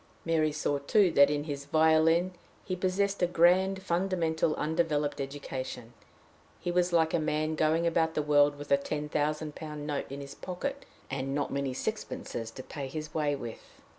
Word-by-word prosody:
Mary 160 -2 +2
saw 145 -1 -1
too 185 +6 +3
that 140 -2 +6
in 145 0 -1
his 140 -2 -5
violin 160 +3 +4 0.3
he 185 - -2
possessed 195 +2 0
a 175 - +4
grand 185 +3 +3
fundamental 170 -3 0
undeveloped 150 -2 0
education; 130 -3 -6 0.7
he 175 - -2
was 180 0 +2
like 160 -2 +3
a 170 - +3
man 155 0 0
going 155 +2 +2
about 165 -1 +1
the 150 - +1
world 145 -1 +4
with 145 0 -9
a 140 - +7
ten 150 +1 -3
thousand 150 +1 -1
pound 150 -2 -7
note 145 -2 -3
in 140 - -5
his 140 0 -8
pocket, 275 - -5 0.3
and 135 0 -2
not 145 -1 -1
many 140 -1 -1
sixpences 115 -2 -4
to 130 +3 -9
pay 140 0 -6
his 155 +3 -6
way 150 -2 +1
with. 120 -5 -9
155 Hz, 175 wpm, -30 LUFS, 145-170 Hz, 0.7 s, a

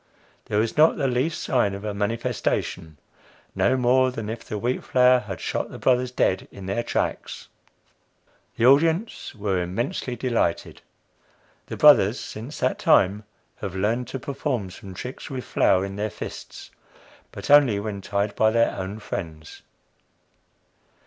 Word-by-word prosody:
There 105 - -2
was 110 +5 0
not 155 +2 +5
the 140 - 0
least 130 +6 -1
sign 105 -6 +1
of 100 - -8
a 105 - -2
"manifestation" 105 -7 -2 0.6
no 130 - +2
more 130 +1 +3
than 115 -4 -5
if 115 - -7
the 105 - -5
wheat 120 +5 -2
flour 125 0 +4
had 95 -7 -7
shot - - -3
the - - -9
"brothers" 125 -1 +2
dead 95 -6 0
in 100 - -10
their 100 +5 -1
tracks. - - -3 1.1
The 115 - +1
audience 160 - +2
were 100 -4 -1
immensely 120 +7 -3
delighted. 115 -8 -1 0.9
The - - -6
"brothers," - - +6
since 120 +8 -8
that 130 - 0
time, 100 +3 +3 0.3
have 95 -3 -6
learned 110 +6 0
to 135 - -5
perform 130 -7 -3
some 95 0 -11
tricks 125 +7 -7
with 130 -3 -5
flour 95 +1 +2
in 100 0 -7
their 105 +1 -1
fists, 105 - -9 0.6
but - - -5
only 140 -8 +6
when 100 -1 -5
tied 100 +1 -2
by 110 - +4
their 115 +1 +2
own 95 +2 -5
friends. 80 -7 -7
115 Hz, 150 wpm, -24 LUFS, 100-125 Hz, 1.1 s, brothers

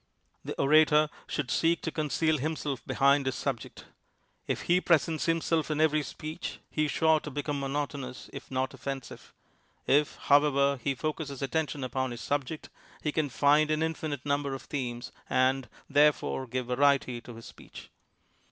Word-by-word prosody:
The - - -6
orator 150 +1 +5 0.2
should 130 -5 -3
seek 165 0 +2
to 160 - -2
conceal 155 0 0
himself 145 -3 -3
behind 140 0 +3
his 130 - 0
subject. 125 -5 -4 0.6
If - - -1
he 180 +1 +3
presents 160 -2 +2
himself 165 -1 +1
in 155 -1 -1
every 155 -1 +3
speech 155 +3 -6
he 155 - +1
is 145 - -2
sure 160 -1 +3
to 150 - -7
become 145 0 -3
monotonous, 140 -2 -4
if 140 - -9
not 130 0 -1
offensive. 135 -1 -7 0.5
If, 145 +2 +3
however, 140 -1 +3
he 140 - 0
focuses 145 -1 -4
attention 145 -1 -1
upon 130 0 -1
his 120 0 -7
subject, 145 +2 -3 0.3
he 150 - 0
can 150 -1 0
find 150 +3 +3
an 155 +1 +1
infinite 155 -4 -3
number 140 -1 0
of 135 - -9
themes 120 -4 -4 0.2
and, 130 0 +2 0.2
therefore, 145 -2 +2
give 125 +1 -3
variety 130 -1 +2
to 120 0 -11
his 115 - -11
speech. - - -13
145 Hz, 160 wpm, -29 LUFS, 135-155 Hz, 0.6 s, orator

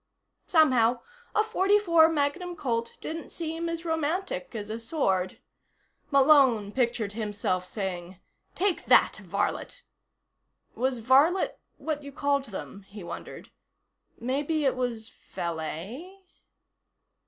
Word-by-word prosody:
Somehow, 255 - +4 0.3
a 430 - +4
.44 380 -6 +4
Magnum 325 +4 -1
Colt 235 -6 -2
didn't 325 +1 -5
seem 330 0 -3
as 335 0 -4
romantic 320 - -2
as 210 -1 -5
a 225 - -4
sword. 195 - -1 0.7
Malone 270 -7 +5
pictured 235 -4 0
himself 205 -4 -2
saying: 180 -3 -5 0.4
"Take 385 -1 0
that, - - +5
varlet." 205 - -3 0.9
Was 255 +1 0
varlet 280 +10 +3 0.2
what 310 -2 -3
you 280 0 -9
called 280 0 0
them, 200 -2 -8
he 205 -2 -9
wondered. - - -8 0.7
Maybe 285 +5 -1
it 265 - +2
was 235 -3 -3 0.2
valet. 190 - -5
265 Hz, 110 wpm, -28 LUFS, 210-320 Hz, 0.9 s, Malone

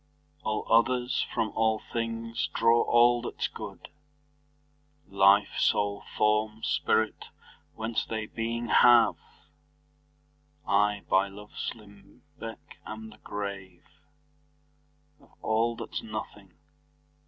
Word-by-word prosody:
All 110 -5 -2
others, 125 +2 +2
from 110 - 0
all 110 0 +1 0.2
things, 115 0 -2
draw 115 +1 +4
all 120 0 +4
that's 120 - -3
good, - - -9 1.2
Life, 100 +1 +4
soule, 100 0 +1
forme, 105 +1 +1
spirit, 110 0 0 0.5
whence 110 0 -2
they 110 -1 -4
beeing 115 +2 -4
have; 120 -1 +6 1.5
I, 105 0 +2
by 95 +1 +3
loves 105 +1 -7
limbecke, 110 +4 -13
am 110 0 -8
the 110 - -17
grave 100 -3 -7 1.3
Of 140 - -24
all, 115 +2 +1
that's - - -5
nothing. 105 -4 -8
110 Hz, 95 wpm, -28 LUFS, 105-115 Hz, 1.5 s, have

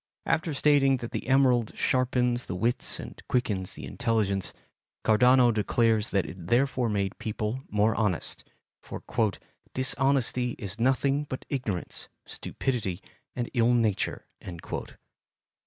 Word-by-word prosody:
After 160 0 +1
stating 135 -2 +4
that 120 -1 -7
the - - -4
emerald 130 -4 +3
sharpens 125 -1 +1
the 90 - -3
wits 120 +6 -1
and - - -9
quickens 105 -7 -1
the - - -8
intelligence, 110 -6 0 0.5
Cardano 125 +3 +5
declares 110 +1 +2
that 100 -2 +1
it 85 -3 -9
therefore 125 +1 +2
made 100 -2 -1
people 110 +3 -3
more 105 +1 +2
honest, 105 -7 -1 0.4
for - - -8 0.7
"dishonesty 130 -2 +1
is 100 +1 -7
nothing 135 +3 +2
but 130 -2 -6
ignorance, 115 -10 -3 0.2
stupidity, 110 -9 -3 0.4
and 120 -1 -3
ill 120 -1 +3
nature." 110 -4 0
120 Hz, 120 wpm, -28 LUFS, 105-130 Hz, 0.7 s, Cardano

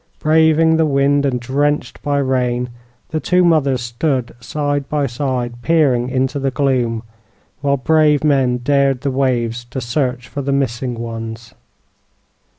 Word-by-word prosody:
Braving 160 +1 +3
the 160 - +3
wind 140 0 +2
and 125 -2 -1
drenched 145 +4 -1
by 145 0 0
rain, 125 -2 0 0.4
the 160 - -2
two 180 +3 +2
mothers 140 -7 +2
stood 120 +2 -2
side 145 +2 -2
by 150 -2 0
side, 120 -2 -3
peering 135 -6 +2
into 130 +2 -1
the 135 0 0
gloom, 125 -4 0 0.6
while 140 -1 +1
brave 150 +1 +3
men 135 -4 +2
dared 135 0 +1
the 140 - -1
waves 120 -3 0
to 120 +3 -6
search 125 0 -2
for 140 - -5
the 140 0 -2
missing 130 -2 -1
ones. 115 0 -7
135 Hz, 145 wpm, -18 LUFS, 120-145 Hz, 0.6 s, Braving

